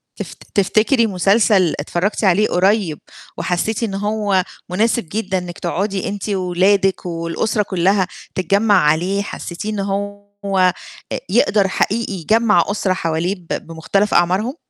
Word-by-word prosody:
تف - - -7 0.2
تفتكري 220 +5 +3
مسلسل 195 -2 +3
اتفرجتِ 175 +9 -2
عليه 200 +2 +4
قريب، 185 -4 +1 0.4
وحسيتِ 180 +6 -1
إن 215 -4 -2
هو 205 -1 0 0.3
مناسب 215 0 0
جدًا 195 -3 -1
إنِك 175 -1 -6
تقعدي 195 0 -2
أنتِ 205 +1 -5
وأولادك 190 0 +1
والأُسرة 170 +5 -1
كلّها 190 0 +1 0.3
تتجمع 200 +4 +2
عليه، 180 +6 +1
حسيتيه 200 0 -6
إن 210 - -3
هو 205 +1 -3 0.9
أ - - -2
يقدر 205 -2 +3
حقيقي 215 +3 -1
يجمع 215 +5 +3
أُسرة 200 -2 0
حواليه 170 +2 -1
ب 175 -3 -19 0.2
بمختلف 195 +6 -1
أعمارهم؟ 190 +9 +2
195 Hz, 125 wpm, -19 LUFS, 180-210 Hz, 0.9 s, عليه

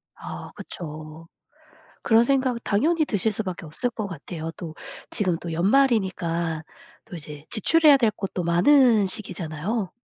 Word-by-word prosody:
아 - - -8
그쵸. 155 0 -9 0.7
그런 230 0 +5
생각 260 -3 +1
당연히 310 +10 +2
드실 220 -2 0
수밖에 195 -6 -5
없을 160 +11 -3
것 220 -3 -5
같아요. 165 -1 -6
또 160 -3 -7 0.3
지금 180 -5 0
또 170 -2 -5
연말이니까 175 - +1 0.4
또 200 - -9
이제 150 -2 -8
지출해야 300 +6 +5
될 230 -5 +2
것도 195 -3 -4
많은 215 - +5
시기잖아요. 185 +1 -2
195 Hz, 280 characters per minute, -24 LUFS, 165-235 Hz, 0.7 s, 그런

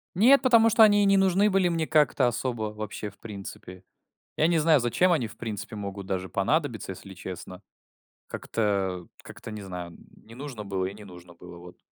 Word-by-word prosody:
Нет, 250 +9 +6
потому 230 -3 +5
что 225 0 +6
они 205 -1 +5
и - - +3
не 195 0 +4
нужны 195 +2 +3
были 190 -2 +2
мне 165 -2 -1
как-то 150 -4 +3
особо 120 -3 -3
вообще 105 0 -6
в 100 - -22
принципе. 95 -3 -9 0.5
Я 155 - +3
не 170 -1 +2
знаю, 155 -1 +4
зачем 130 +10 +2
они 135 -9 +1
в - - -14
принципе 110 -2 -6
могут 100 -1 -6
даже 95 -1 -3
понадобиться, 120 0 -1
если 95 +1 -10
честно. 90 0 -9 0.7
Как-то, 95 -5 -2
как-то - - -10
не 105 -1 -7
знаю, 90 -3 -8 0.3
не 115 +1 -14
нужно 130 -5 -7
было 95 -2 -2
и 95 - -4
не 105 +1 -12
нужно 90 -2 -13
было, 90 0 -13
вот. 90 0 -13
110 Hz, 190 wpm, -26 LUFS, -, 0.7 s, Нет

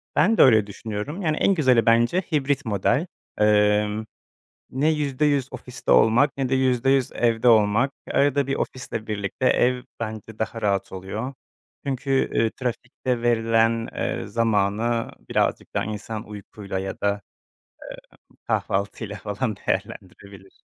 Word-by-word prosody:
Ben 200 +10 +3
de - - +6
öyle 110 -5 +6
düşünüyorum. 110 - -5
Yani 155 -4 0
en 195 - +3
güzeli 130 -9 +3
bence 120 +10 +3
hibrit 145 -2 0
model. 110 - +1 0.3
Emm, 105 0 +2 0.6
ne 140 +4 +1
%100 145 -2 0
ofiste 125 0 -5
olmak 125 +6 +4
ne 135 -2 -1
de 135 - +2
%100 130 0 +2
evde 115 0 +1
olmak. 110 +3 +4 0.2
Arada 140 -1 +2
bir 135 - 0
ofisle 115 -3 -4
birlikte 105 +3 -3
ev 125 0 +2 0.2
bence 110 -1 -6
daha 115 +1 -3
rahat 100 -2 0
oluyor. 100 +8 -5 0.5
Çünkü, 135 0 0
eee, 115 - +2
trafikte 125 0 -3
verilen, 115 -1 +2
eee, - - -2
zamanı 115 +1 0 0.2
birazcık - - 0
daha - - 0
insan 110 +1 -5
uykuyla 100 -1 -7
ya 95 0 -5
da, 100 0 0 1.1
eee, - - -24
kahvaltıyla 100 +1 -2
falan 105 +2 -3
değerlendirebilir. 95 +1 -6
115 Hz, 130 wpm, -24 LUFS, 105-130 Hz, 1.1 s, de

